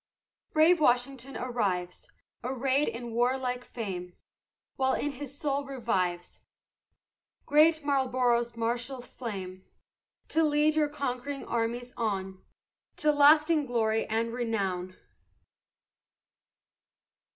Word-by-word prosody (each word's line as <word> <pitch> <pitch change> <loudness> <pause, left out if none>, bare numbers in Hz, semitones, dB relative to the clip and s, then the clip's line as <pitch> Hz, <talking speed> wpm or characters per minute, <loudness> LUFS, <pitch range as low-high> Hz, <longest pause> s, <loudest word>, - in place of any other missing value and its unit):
Brave 320 +3 +5
Washington 260 -1 +1
arrives, 200 -8 -2 0.4
Arrayed 265 +3 +1
in 235 +1 -5
warlike 250 +1 0
fame, 185 -8 -6 0.6
While 265 0 +2
in 290 - -1
his 280 0 -8
soul 285 -1 -1
revives 195 -10 -2 1.1
Great 310 +1 +4
Marlboro's 250 -4 +1
martial 240 +3 -2
flame, 195 -7 -7 0.7
To 325 - +2
lead 300 0 +3
your 300 -1 +2
conquering 275 -1 -4
armies 240 +2 -2
on 195 -4 -3 0.5
To 305 - +3
lasting 300 +1 +5
glory 225 -2 +1
and 230 +1 -1
renown. 195 -7 -2
245 Hz, 95 wpm, -29 LUFS, 225-280 Hz, 1.1 s, Brave